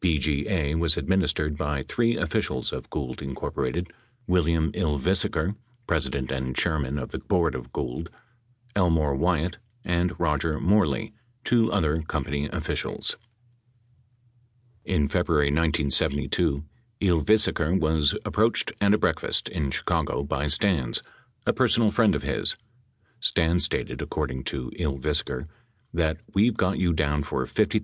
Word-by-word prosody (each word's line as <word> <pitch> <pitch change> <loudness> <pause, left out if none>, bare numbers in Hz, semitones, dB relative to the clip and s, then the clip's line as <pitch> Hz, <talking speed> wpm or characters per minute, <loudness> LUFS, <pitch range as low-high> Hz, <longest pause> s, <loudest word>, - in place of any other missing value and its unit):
BGA 80 0 +1
was 85 -1 +2
administered 85 -5 +1
by 75 -2 -2
three 115 - +1
officials 65 - -1
of - - -6
Gould, 65 -4 -4
Inc.: 70 +4 -3 0.4
William 85 -3 +2
Ylvisaker, 85 +3 0 0.3
president 70 - -1
and 65 -1 -3
chairman 75 -5 0
of 65 - -4
the - - -4
board 85 -3 +1
of 60 -1 -7
Gould, 65 +9 -4 0.7
Elmore 80 -7 +2
Wyatt, 85 +5 0 0.3
and 90 0 0
Roger 75 -1 0
Moreley, 105 +3 +2 0.3
two 115 -2 +3
other 80 -5 +1
company 75 -2 -2
officials. - - -2 1.7
In 75 -6 +1
February 80 -2 +2
1972, 75 -1 +1 0.4
Ylvisaker 90 -1 +3
was 80 -2 +2
approached - - +2
at 100 0 +5
a - - +1
breakfast - - 0
in 75 -6 -2
Chicago 70 +1 -1
by 70 +1 -1
Stans, 75 -4 +1 0.4
a - - +3
personal 115 -3 +3
friend 110 -2 +3
of - - -3
his. - - +1 0.6
Stans 85 -6 +3
stated, - - -2
according 65 0 -3
to 65 -2 -3
Ylvisaker, 70 -3 -1 0.5
that, 80 -2 +1 0.2
"we've 110 +3 +3
got 95 +1 +1
you 90 -2 +2
down 75 -2 +1
for 65 -2 -2
$50,000." 110 - +1
80 Hz, 125 wpm, -26 LUFS, 70-90 Hz, 1.7 s, at